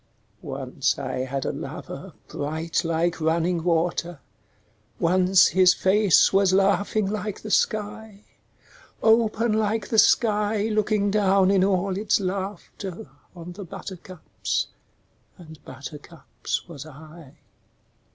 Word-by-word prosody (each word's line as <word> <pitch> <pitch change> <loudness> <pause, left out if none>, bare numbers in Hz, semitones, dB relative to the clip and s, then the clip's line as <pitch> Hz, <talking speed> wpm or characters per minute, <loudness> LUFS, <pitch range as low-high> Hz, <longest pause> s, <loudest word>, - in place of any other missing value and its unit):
Once - - -2
I - - -4
had 135 0 -4
a - - 0
lover - - -8
bright 160 +4 -3
like 165 +1 -1
running 165 +1 0
water, 170 -1 -1 0.8
Once 185 +2 +4
his 185 -1 +5
face 195 -1 +4
was 195 -1 +3
laughing 200 +2 +2
like 210 0 -4
the 215 - -7
sky; 210 0 -1 0.8
Open 225 0 +3
like 215 -1 -1
the 220 - +3
sky 210 -1 +2
looking 210 -1 +1
down 195 -2 +3
in 195 -2 +3
all 190 0 +1
its 205 +2 +1
laughter 190 -4 -5 0.2
On 175 0 -9
the 200 +3 -8
buttercups 185 -1 -5 0.7
and 160 -4 -14
buttercups 145 +8 -7
was 150 -6 -9
I. 155 0 -14
190 Hz, 110 wpm, -24 LUFS, 165-205 Hz, 0.8 s, his